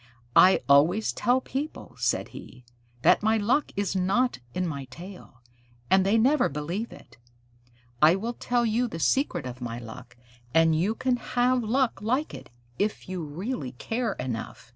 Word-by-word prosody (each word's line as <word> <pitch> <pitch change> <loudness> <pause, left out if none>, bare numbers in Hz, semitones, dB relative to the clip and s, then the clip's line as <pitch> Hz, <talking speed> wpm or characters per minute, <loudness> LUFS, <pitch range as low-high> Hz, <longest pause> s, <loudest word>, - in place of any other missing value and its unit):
"I 190 +1 +7
always 155 +10 +4
tell 250 +2 +1
people," 285 +4 -5
said - - 0
he, 125 -1 -12 0.4
"that - - +5
my 220 +1 +2
luck 235 +8 +1
is 200 -1 -1
not 195 - +1 0.2
in 180 0 0
my 140 -5 -4
tail, 170 -2 -12 0.5
and 190 0 +5
they 200 +4 +3
never 260 +4 +3
believe 170 +10 -4
it. 120 0 -15 0.8
I 155 +3 +7
will 225 +5 -3
tell 240 0 0
you 235 +2 +1
the 165 - -6
secret 175 - 0
of 125 0 -7
my 120 -1 -4
luck, 115 0 -11 0.4
and 165 -1 +5
you 190 +8 0
can 255 +1 0
have 250 +1 +1
luck 245 0 0
like 255 +8 -1
it, - - -10 0.3
if 210 +1 -1
you 185 -2 -4
really 155 - -5
care 225 - -2
enough." 120 -2 -6
195 Hz, 165 wpm, -26 LUFS, 150-240 Hz, 0.8 s, I